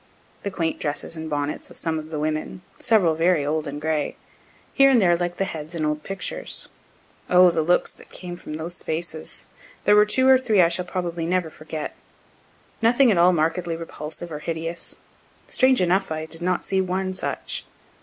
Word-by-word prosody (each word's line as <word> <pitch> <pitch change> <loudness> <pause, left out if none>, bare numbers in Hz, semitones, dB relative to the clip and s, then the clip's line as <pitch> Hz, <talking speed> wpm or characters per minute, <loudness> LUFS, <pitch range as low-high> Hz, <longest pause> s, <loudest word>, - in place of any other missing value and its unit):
The 200 - -3
quaint 165 -4 -2
dresses 150 +2 -2
and 160 0 -5
bonnets 145 0 -3
of - - -11
some 160 -1 -1
of 155 0 -9
the 155 - -4
women, 155 +4 -3 0.2
several 195 -8 +3
very 165 -2 +2
old 155 +1 -1
and 145 +1 -5
gray, 155 -1 -1 0.6
here 275 -1 +6
and 260 -3 +5
there 175 -4 +4
like 175 0 -2
the 195 - +1
heads 160 -1 -6
in 155 -2 -1
old 150 0 -1
pictures. 195 +4 -2 0.6
O 180 0 +7
the 165 -1 +1
looks 175 +3 +2
that - - -15
came 175 -1 -7
from 165 - -8
those 165 +3 -5
faces! 160 0 -4 0.4
There 205 - +5
were 210 0 +6
two 260 +5 +3
or 265 -1 +7
three 220 -6 +2
I 170 -2 +6
shall 175 +1 0
probably 175 -2 -3
never 180 -2 0
forget. 155 -1 -6 0.9
Nothing 240 +2 +5
at 185 - +2
all 175 +1 +6
markedly 165 +1 0
repulsive 165 0 -7
or 150 - -4
hideous 165 +1 -4 0.5
strange 260 -3 +3
enough 185 0 +2
I 155 0 -2
did 165 +1 -9
not 180 0 0
see 190 0 +1
one 185 0 -1
such. 185 - -3
170 Hz, 190 wpm, -24 LUFS, 155-185 Hz, 0.9 s, O